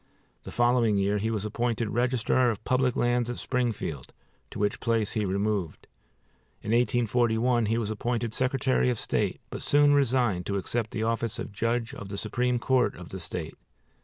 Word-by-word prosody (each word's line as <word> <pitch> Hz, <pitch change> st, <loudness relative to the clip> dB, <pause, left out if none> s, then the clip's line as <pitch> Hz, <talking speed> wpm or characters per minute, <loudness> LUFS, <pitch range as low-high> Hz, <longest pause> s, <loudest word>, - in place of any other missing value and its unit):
The -, -, -7 dB
following 120 Hz, -3 st, +3 dB
year 100 Hz, +1 st, +1 dB
he 110 Hz, +3 st, -1 dB
was 110 Hz, -2 st, -2 dB
appointed 115 Hz, 0 st, -1 dB
Register 125 Hz, +1 st, +2 dB
of 110 Hz, -2 st, -4 dB
Public 130 Hz, -1 st, +1 dB
Lands 120 Hz, 0 st, +1 dB
at 120 Hz, -, -4 dB
Springfield, 115 Hz, -, -3 dB, 0.4 s
to -, -, -8 dB
which 105 Hz, 0 st, 0 dB
place 115 Hz, -3 st, 0 dB
he 110 Hz, -2 st, -1 dB
removed. 100 Hz, -3 st, -2 dB, 0.8 s
In 105 Hz, -, -3 dB
1841 120 Hz, 0 st, +2 dB
he 115 Hz, +2 st, +1 dB
was 110 Hz, -2 st, -2 dB
appointed 115 Hz, +1 st, -2 dB
Secretary 130 Hz, 0 st, +1 dB
of 125 Hz, -, 0 dB
State; -, -, -1 dB
but -, -, -5 dB
soon 145 Hz, 0 st, +4 dB
resigned, 125 Hz, -9 st, +2 dB
to 100 Hz, -, -1 dB
accept 110 Hz, +3 st, -2 dB
the 110 Hz, -, -3 dB
office 115 Hz, 0 st, -1 dB
of -, -, -5 dB
Judge 115 Hz, +3 st, -1 dB
of 100 Hz, -, -8 dB
the 100 Hz, -, -5 dB
Supreme 125 Hz, +4 st, 0 dB
Court 125 Hz, +1 st, +1 dB
of -, -, -10 dB
the -, -, -6 dB
State. -, -, -5 dB
115 Hz, 175 wpm, -27 LUFS, 105-125 Hz, 0.8 s, soon